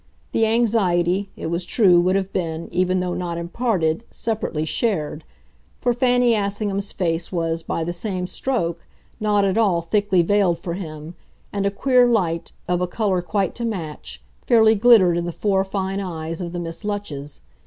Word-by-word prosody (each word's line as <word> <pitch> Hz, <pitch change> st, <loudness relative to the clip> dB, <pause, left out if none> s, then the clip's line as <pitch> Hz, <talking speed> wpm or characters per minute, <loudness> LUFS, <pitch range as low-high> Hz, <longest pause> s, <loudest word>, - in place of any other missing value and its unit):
The 225 Hz, -, +2 dB
anxiety, 200 Hz, -5 st, +1 dB
it -, -, -7 dB
was 170 Hz, +2 st, -1 dB
true, 180 Hz, -4 st, +4 dB
would 185 Hz, +2 st, +2 dB
have 195 Hz, 0 st, -1 dB
been, 165 Hz, -2 st, -3 dB
even 185 Hz, +1 st, +1 dB
though 180 Hz, -1 st, -2 dB
not 175 Hz, -2 st, -3 dB
imparted, 170 Hz, -1 st, -1 dB
separately 210 Hz, -9 st, -2 dB
shared; 160 Hz, -5 st, -1 dB, 0.6 s
for 245 Hz, -, +1 dB
Fanny 245 Hz, -1 st, +3 dB
Assingham's 200 Hz, -1 st, -2 dB
face 170 Hz, -2 st, -2 dB
was, 165 Hz, -2 st, -1 dB
by 165 Hz, -, -3 dB
the 175 Hz, +2 st, -2 dB
same 185 Hz, 0 st, -3 dB
stroke, 175 Hz, -6 st, -2 dB, 0.3 s
not 210 Hz, -2 st, +2 dB
at 195 Hz, +3 st, +1 dB
all 185 Hz, -7 st, +2 dB
thickly 200 Hz, -1 st, +2 dB
veiled 190 Hz, -2 st, +2 dB
for 170 Hz, -, -5 dB
him, 160 Hz, -3 st, -7 dB, 0.4 s
and 200 Hz, -1 st, 0 dB
a -, -, +3 dB
queer 250 Hz, +4 st, +3 dB
light, 175 Hz, -8 st, 0 dB, 0.2 s
of 180 Hz, 0 st, 0 dB
a 180 Hz, -, +1 dB
colour 190 Hz, -1 st, 0 dB
quite 185 Hz, +3 st, -1 dB
to 240 Hz, -, -6 dB
match, 150 Hz, -, -5 dB, 0.2 s
fairly 220 Hz, -2 st, +6 dB
glittered 205 Hz, -6 st, +5 dB
in 170 Hz, -, -3 dB
the 175 Hz, -, -3 dB
four 195 Hz, +2 st, +1 dB
fine 195 Hz, 0 st, -3 dB
eyes 165 Hz, -3 st, -5 dB
of 170 Hz, -1 st, -4 dB
the 175 Hz, -, -4 dB
Miss 165 Hz, +3 st, -6 dB
Lutches. 160 Hz, -9 st, -5 dB
185 Hz, 175 wpm, -22 LUFS, 170-210 Hz, 0.6 s, fairly